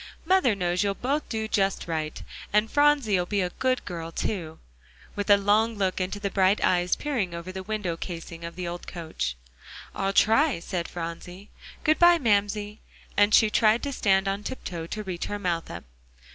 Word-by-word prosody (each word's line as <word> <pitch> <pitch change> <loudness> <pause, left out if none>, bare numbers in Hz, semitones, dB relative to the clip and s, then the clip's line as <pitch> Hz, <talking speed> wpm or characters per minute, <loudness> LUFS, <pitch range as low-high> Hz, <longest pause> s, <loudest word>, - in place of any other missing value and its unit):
"Mother 345 - +3
knows 180 -1 0
you'll 200 -1 0
both 280 +7 -2
do 220 -1 -2
just 195 -4 0
right. 155 -2 -3 0.3
And 210 +2 +2
Phronsie'll 275 -11 +3
be 200 0 0
a 180 -1 -1
good 255 +4 -1
girl 165 -2 -6
too," 165 -3 -3 0.6
with 205 0 -3
a 205 - +8
long 215 +3 +2
look 190 -2 -1
into 190 +3 -3
the 200 -1 -3
bright 190 +1 +3
eyes 180 0 +2
peering 230 -13 -2
over 170 +2 -6
the 190 0 -6
window 200 -4 -3
casing 165 -1 -7
of 170 0 -7
the 180 -1 -4
old 175 0 -6
coach. 160 - -4 0.6
"I'll 195 0 -1
try," 225 - +3
said 170 0 -4
Phronsie. 175 +3 -7 0.3
"Good 310 0 +3
by, 345 0 +7
Mamsie," 210 -4 0 0.4
and 205 +1 +4
she 220 -1 +5
tried 220 +2 +3
to 280 - -3
stand 195 -4 +2
on 195 +1 -1
tiptoe 175 -9 -6
to 215 +4 -5
reach 185 -3 -4
her 205 - -3
mouth 175 -4 -2
up. 85 - -7
195 Hz, 185 wpm, -26 LUFS, 175-220 Hz, 0.6 s, a